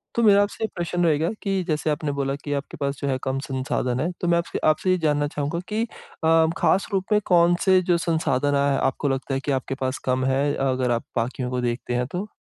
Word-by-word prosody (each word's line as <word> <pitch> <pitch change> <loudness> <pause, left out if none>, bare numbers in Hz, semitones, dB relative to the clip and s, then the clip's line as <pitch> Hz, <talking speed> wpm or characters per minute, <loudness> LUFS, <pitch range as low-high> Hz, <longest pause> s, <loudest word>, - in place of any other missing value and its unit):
तो 235 - +2
मेरा 205 -2 +6
आपसे 205 +2 -5
ये 220 - +2
प्रश्न 175 +1 -1
रहेगा 160 +1 +2
कि 195 -2 -1
जैसे 155 -1 0
आपने 150 0 -1
बोला 135 0 -1
कि 145 - -2
आपके 140 0 -4
पास 140 -1 -2
जो 140 - -1
है 135 -1 +1
कम 135 0 -1
संसाधन 130 -1 -2
है, 165 +5 0
तो 175 - -1
मैं 170 0 +4
आपसे 170 - -2
आपसे 155 +4 +2
ये 185 - +3
जानना 150 -3 +1
चाहूँगा 150 +3 -3
कि 215 +2 -1
अ, 220 -7 -9 0.3
ख़ास 195 - +2
रूप 190 -1 +1
में 210 - +5
कौन-से 175 +1 +4
जो 175 -1 +2
संसाधन 145 -5 0
आए 140 0 +2
हैं 135 - 0
आपको 140 +2 0
लगता 135 +1 -2
है 135 - 0
कि 145 - 0
आपके 135 0 -2
पास 130 0 -1
कम 130 0 +1
है, 140 +2 +1
अगर 130 -2 0
आप 115 -1 0
बाकियों 125 +2 -2
को 125 0 -2
देखते 120 0 -2
हैं 125 0 0
तो? 180 +8 -4
145 Hz, 240 wpm, -24 LUFS, 135-175 Hz, 0.3 s, मेरा